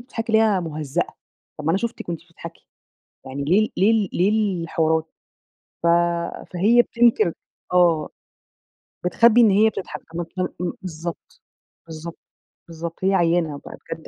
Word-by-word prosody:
بتضحكي 235 -2 -5
ليه 220 - +6
يا 210 -4 +3
مُهزّأة، 155 0 -3 0.4
طَب 150 - -7
ما 160 - +2
أنا 190 - +2
شُفتِك 235 -4 -5
وأنتِ 170 -2 -3
بتضحكي، 165 0 -12 0.6
يعني 140 +2 -4
ليه 185 +8 +4
ال - - -6
ليه 200 +4 +4
ال 215 -4 +2
ليه 200 -2 +1
الحوارات؟ 160 -1 0 0.7
ف - - 0 0.7
فهي 220 +7 +4
بتنكِر 235 -9 +3 0.4
آه. 170 -4 +3 1.0
بتخبّي 230 +6 +5
إن 225 - +6
هي 210 +3 +5
بتضحك، 190 - -7
طَب - - -8 0.2
م - - +1
م 180 - 0 0.2
م - - -3
بالضبط. 170 -1 -7 0.4
بالضبط. 165 +1 -8 0.5
بالضبط. 165 +1 -7
هي 195 - +3
عيّانة 165 -4 +1
بقى - - -9
بجد، - - -6
175 Hz, 155 wpm, -22 LUFS, 165-215 Hz, 1.0 s, ليه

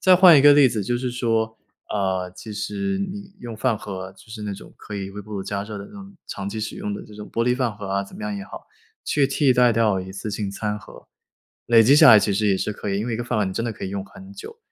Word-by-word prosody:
再 185 - +6
换 180 -4 +8
一 135 - +4
个 145 - +9
例 145 -2 +6
子 110 -5 -3
就 120 +3 -1
是 125 -1 -2
说， 115 -2 -1 0.3
呃， 95 -2 -1
其 110 - -8
实 195 - -3
你 195 0 -6
用 120 -2 -7
饭 115 -1 0
盒， 95 -1 -7
就 110 - -19
是 110 -1 -7
那 105 - -3
种 100 - -11
可 105 - -9
以 100 -1 -4
微 105 +1 -8
波 105 - -12
炉 100 -2 -3
加 100 0 -3
热 105 -1 -7
的 100 - -7
那 - - -17
种 200 -1 -11
长 95 - -6
期 110 +1 -5
使 110 - -4
用 105 - -4
的 - - -6
这 105 - -14
种 105 0 -10
玻 115 - 0
璃 125 +1 +2
饭 120 -5 -1
盒 100 -1 -7
啊， 100 0 0
怎 - - -14
么 215 - -9
样 210 -1 -3
也 200 - -6
好， - - -11 0.4
去 145 -2 +2
替 135 -1 +2
代 125 -1 +5
掉 110 -4 +2
一 95 +1 -8
次 105 +2 -5
性 105 -1 -3
餐 105 +1 -3
盒。 105 - -15 0.6
累 115 -1 +6
积 135 +6 +6
下 135 - +9
来 110 - +9
其 105 - 0
实 105 +1 +1
也 100 -2 +3
是 105 - -2
可 105 - -5
以， 100 - 0
因 110 - -3
为 120 - -2
一 - - -2
个 120 - -4
饭 120 -2 -1
盒 105 - +2
你 95 - -3
真 115 - -2
的 115 - -2
可 - - -8
以 - - -5
用 100 0 -4
很 195 - -13
久， 445 - -10
110 Hz, 325 characters per minute, -23 LUFS, 100-130 Hz, 0.6 s, 个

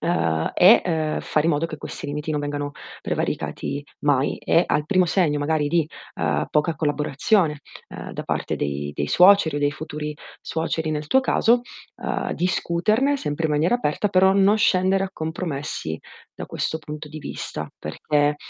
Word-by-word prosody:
Uhm, 80 - 0
e, 190 +6 +7
ehm, 160 -3 -1
fare 155 +1 0
in - - +4
modo 150 +3 0
che 155 - -7
questi 150 - -7
limiti 150 +2 -4
non 150 - 0
vengano 145 0 -3 0.3
prevaricati 140 +1 -3 0.2
mai 145 -2 +1
e 165 - +3
al 150 0 0
primo 185 0 +3
segno 160 -5 +1
magari 150 0 +1
di, 160 0 +1 0.3
uhm, 75 -2 0
poca 155 +2 +1
collaborazione, 150 +2 +1 0.3
uhm, - - -8
da - - -5
parte - - -2
dei 70 0 -3
dei 70 - -2
suoceri 180 -4 +5
o - - 0
dei 145 0 +1
futuri 150 0 -6 0.3
suoceri 160 -1 -2
nel 150 0 -4
tuo 265 - +5
caso, 240 -2 +3 0.3
uhm, - - -3
discuterne 210 +10 +1
sempre 155 - -2
in - - -3
maniera 155 +8 +2
aperta 210 -5 0
però 190 0 +4
non 200 +2 +4
scendere 190 -2 +3
a 195 - -3
compromessi 155 - -4 0.3
da - - -8
questo 160 - -2
punto 150 -1 -8
di 155 +1 -8
vista - - -5
perché 145 - 0
155 Hz, 170 wpm, -23 LUFS, 145-180 Hz, 0.3 s, e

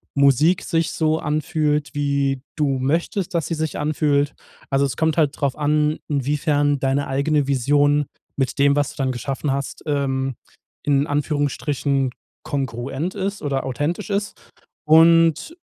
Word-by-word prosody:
Musik 140 +5 +4
sich 165 0 0
so 160 0 +1
anfühlt, 150 -1 -1
wie 140 -2 0
du 140 -4 0
möchtest, 165 +6 -1
dass 165 - +1
sie - - -3
sich 160 -1 -2
anfühlt. 145 -1 +1 0.4
Also, 135 +1 +3
es 125 -4 -4
kommt 160 -1 +1
halt 150 -3 +1
drauf 140 -3 0
an, 150 +1 +1
inwiefern 145 +1 +1
deine 135 +2 0
eigene 140 +1 +1
Vision 145 +2 +2 0.3
mit 135 -1 -1
dem, 140 0 +4
was 145 -1 +1
du - - -22
dann 135 -2 0
geschaffen 135 +3 -3
hast, 140 0 -4
ähm,- 135 -3 -1 0.5
in 140 -1 +2
Anführungsstrichen- 145 -2 -1 0.3
kongruent 135 +5 -3
ist 200 0 -3
oder 140 -2 -1
authentisch 145 - -2
ist. 200 0 -1 0.5
Und 165 - +5
145 Hz, 140 wpm, -21 LUFS, 140-155 Hz, 0.5 s, Und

